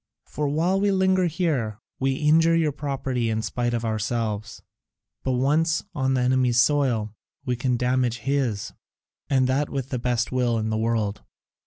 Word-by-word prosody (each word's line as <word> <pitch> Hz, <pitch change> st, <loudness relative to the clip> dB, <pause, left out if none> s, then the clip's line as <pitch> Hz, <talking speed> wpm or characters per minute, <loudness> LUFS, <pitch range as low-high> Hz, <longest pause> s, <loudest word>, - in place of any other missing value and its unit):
For 150 Hz, -1 st, -3 dB
while 170 Hz, +7 st, +1 dB
we 205 Hz, -, +3 dB
linger 190 Hz, -1 st, +3 dB
here, 145 Hz, -, -1 dB, 0.2 s
we 135 Hz, 0 st, +1 dB
injure 160 Hz, +3 st, +4 dB
your 160 Hz, -2 st, +2 dB
property 135 Hz, -4 st, -2 dB
in 110 Hz, 0 st, -1 dB
spite 120 Hz, +1 st, -1 dB
of 115 Hz, 0 st, -2 dB
ourselves, 110 Hz, -1 st, -2 dB, 0.6 s
but 130 Hz, -, 0 dB
once 150 Hz, +6 st, +1 dB
on 130 Hz, -4 st, 0 dB
the 130 Hz, -, +1 dB
enemy's 125 Hz, -1 st, +2 dB
soil, 120 Hz, -6 st, +2 dB, 0.3 s
we 125 Hz, -, 0 dB
can 125 Hz, 0 st, 0 dB
damage 125 Hz, -1 st, +1 dB
his, 120 Hz, -4 st, -1 dB, 0.6 s
and 130 Hz, -2 st, +3 dB
that 135 Hz, +3 st, 0 dB
with 135 Hz, -1 st, -4 dB
the 125 Hz, -, -2 dB
best 120 Hz, -1 st, -1 dB
will 125 Hz, -2 st, +1 dB
in 110 Hz, 0 st, -1 dB
the -, -, 0 dB
world. 110 Hz, -2 st, -1 dB
130 Hz, 165 wpm, -24 LUFS, 115-145 Hz, 0.6 s, injure